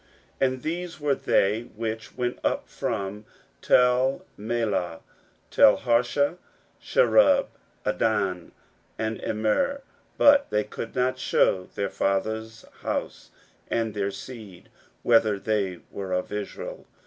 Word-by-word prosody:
16:007:061 135 - +5
And 130 -1 -7
these 170 +1 -4
were 145 -1 +1
they 105 -4 +2
which 110 +1 -5
went 125 -1 -2
up - - 0
also - - -32
from 100 +2 -4 0.4
Telmelah, 120 - +1 0.5
Telharesha, 125 +9 +3 0.4
Cherub, 485 - +4 0.4
Addon, 105 -5 0 0.5
and 110 0 -3
Immer: 110 - 0 0.3
but 285 -1 +6
they 105 0 +1
could 115 - -7
not 130 0 +1
shew 90 -1 +2
their 100 -1 -2
father's 110 +3 -2 0.2
house, - - -4 0.4
nor 115 -1 0
their 100 -1 -1
seed, 100 -2 -10 0.3
whether 115 -3 +4
they 100 -4 -1
were 95 -2 -4
of 90 0 -2
Israel. 105 -1 -6
110 Hz, 115 wpm, -26 LUFS, 100-130 Hz, 0.5 s, but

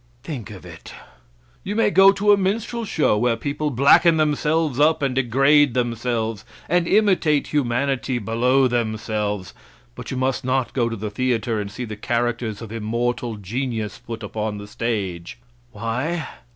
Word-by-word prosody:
'" 120 - -36
Think 135 - -6
of - - -11
it! - - -11 0.7
"You 205 - -4
may 225 -2 +2
go 195 0 +7
to 205 +1 +2
a - - +8
minstrel 225 +4 -2
show, 150 - +1
where 120 0 +2
people 145 +4 -2
blacken 145 +5 +5
themselves 150 -1 +1
up 155 0 +3
and 135 -2 0
degrade 135 +2 +3
themselves, 115 -3 -1 0.2
and 175 -1 +1
imitate 185 -9 +2
humanity 130 -1 0
below 125 +4 +2
themselves, 110 -4 -2 0.4
but - - -9
you 130 - -3
must 130 +1 -1
not 130 0 -1
go 120 -3 +1
to 115 - -4
the 105 0 -5
theater 115 -2 -1
and 100 - -5
see 125 +4 -5
the 110 -2 -6
characters 115 -1 -2
of 110 - -9
immortal 115 +1 -2
genius 110 +1 -4
put 115 -1 -8
upon 105 0 -3
the 100 - -8
stage." 100 -6 -4 0.3
Why? 130 +9 -3
125 Hz, 160 wpm, -22 LUFS, 110-145 Hz, 0.7 s, a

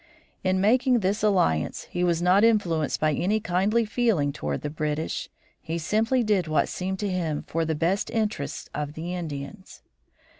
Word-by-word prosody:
In 185 0 +2
making 245 +4 +3
this 200 +3 0
alliance 180 - +1
he 175 - -1
was 170 -1 +1
not 185 +3 +5
influenced 175 -10 +2
by 155 0 +2
any 200 +9 +1
kindly 210 +4 +1
feeling 210 - +1
toward 75 - -3
the - - -2
British. 155 +1 -3 0.3
He 165 +1 -3
simply 220 +9 +1
did 205 -5 +1
what 155 -2 +1
seemed 190 +1 -3
to 205 - -1
him 165 -5 -2
for 165 0 -1
the 160 0 -1
best 175 +6 0
interests 210 - -2
of 150 0 -4
the 170 +3 -5
Indians. 165 +2 -7
180 Hz, 165 wpm, -26 LUFS, 155-210 Hz, 0.3 s, not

